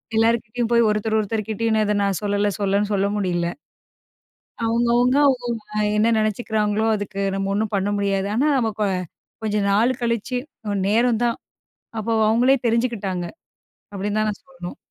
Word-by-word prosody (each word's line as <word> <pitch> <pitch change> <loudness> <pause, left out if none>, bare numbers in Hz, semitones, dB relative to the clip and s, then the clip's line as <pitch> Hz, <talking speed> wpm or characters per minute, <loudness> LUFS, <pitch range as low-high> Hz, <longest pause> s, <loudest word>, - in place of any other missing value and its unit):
எல்லார்கிட்டயும் 230 +1 +1
போய், 235 -1 +5
ஒருத்தர், 215 +1 0
ஒருத்தர் 215 0 -2
கிட்டயும் 225 +1 0
நான் 215 - +2
இதை 210 - +1
நான் 195 -2 0
சொல்லல, 205 0 +1
சொல்லன்னு 200 +1 +1
சொல்ல 200 0 +2
முடியல. 175 -3 0 1.2
அவுங்கவங்க 240 +2 +2
அவுங்கவங்க 245 -4 0 0.2
வே - - +2
என்னா 220 +2 +3
நெனைச்சிக்கிறாங்களோ, 215 0 0
அதுக்கு 200 -1 -5
நம்ம 195 0 -1
ஒண்ணும் 215 +1 -1
பண்ண 195 +1 0
முடியாது. 195 -1 0
ஆனா, 280 +6 +2
நம்ம 225 -3 +1
கொ - - +3 0.6
கொஞ்ச 210 -1 0
நாளு 220 +5 +3
கழிச்சு 235 +2 -1 0.3
அ 205 - -1
நேரம் 230 +1 +2
தான், 235 -1 0 0.6
அப்ப 215 - -5 0.2
அவுங்களே 245 +5 +4
தெரிஞ்சுக்கிட்டாங்க. 225 -7 -1 0.7
அப்டின்னு 205 +2 -2
தான் 215 - +1
நான் 205 - -6
சொல்ணும். 260 -10 -9
215 Hz, 155 wpm, -22 LUFS, 200-235 Hz, 1.2 s, போய்